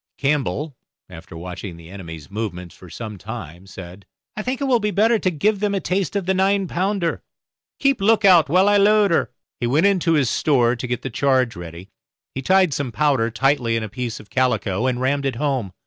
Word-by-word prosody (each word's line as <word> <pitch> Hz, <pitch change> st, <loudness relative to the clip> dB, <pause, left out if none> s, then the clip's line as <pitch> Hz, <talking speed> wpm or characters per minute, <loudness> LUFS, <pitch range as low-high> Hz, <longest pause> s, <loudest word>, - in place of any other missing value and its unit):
Campbell, 145 Hz, +1 st, -1 dB, 0.4 s
after 80 Hz, 0 st, -11 dB
watching 90 Hz, +1 st, -7 dB
the 85 Hz, -1 st, -13 dB
enemy's 80 Hz, -6 st, -9 dB
movements 90 Hz, -5 st, -5 dB
for 90 Hz, -, -15 dB
some 105 Hz, +2 st, -8 dB
time, 95 Hz, -4 st, -8 dB
said, 95 Hz, +1 st, -11 dB, 0.3 s
"I 215 Hz, -, -3 dB
think 255 Hz, +3 st, -3 dB
it -, -, -3 dB
will 260 Hz, -3 st, +3 dB
be 210 Hz, -1 st, -1 dB
better 220 Hz, +4 st, +2 dB
to 185 Hz, -, +1 dB
give 195 Hz, +5 st, 0 dB
them 205 Hz, -1 st, 0 dB
a -, -, 0 dB
taste 190 Hz, +1 st, -2 dB
of 200 Hz, -3 st, -1 dB
the 190 Hz, -, +1 dB
nine 195 Hz, +1 st, +1 dB
pounder. 185 Hz, -1 st, -1 dB, 0.6 s
Keep 275 Hz, -6 st, +1 dB
a -, -, 0 dB
look 225 Hz, -1 st, +4 dB
out 175 Hz, -6 st, +6 dB
while 185 Hz, +5 st, +4 dB
I 205 Hz, 0 st, +4 dB
load 205 Hz, 0 st, +4 dB
her." 165 Hz, -, +1 dB, 0.3 s
He 120 Hz, -, -1 dB
went 150 Hz, +9 st, +2 dB
into 185 Hz, -4 st, +2 dB
his 145 Hz, -5 st, +2 dB
store 125 Hz, -2 st, +2 dB
to 125 Hz, +1 st, -5 dB
get 125 Hz, -1 st, -3 dB
the -, -, -4 dB
charge 130 Hz, -2 st, +1 dB
ready. 85 Hz, +3 st, -10 dB, 0.4 s
He 135 Hz, -, -4 dB
tied 185 Hz, +1 st, +3 dB
some 140 Hz, -3 st, -3 dB
powder 135 Hz, -5 st, +1 dB
tightly 120 Hz, 0 st, +1 dB
in 115 Hz, -, -1 dB
a 110 Hz, -, -5 dB
piece 120 Hz, +1 st, -5 dB
of 105 Hz, -, -16 dB
calico 125 Hz, -4 st, 0 dB
and 125 Hz, -1 st, -1 dB
rammed 140 Hz, +2 st, 0 dB
it 130 Hz, -, -2 dB
home. 130 Hz, -7 st, -2 dB
135 Hz, 215 wpm, -21 LUFS, -, 0.6 s, out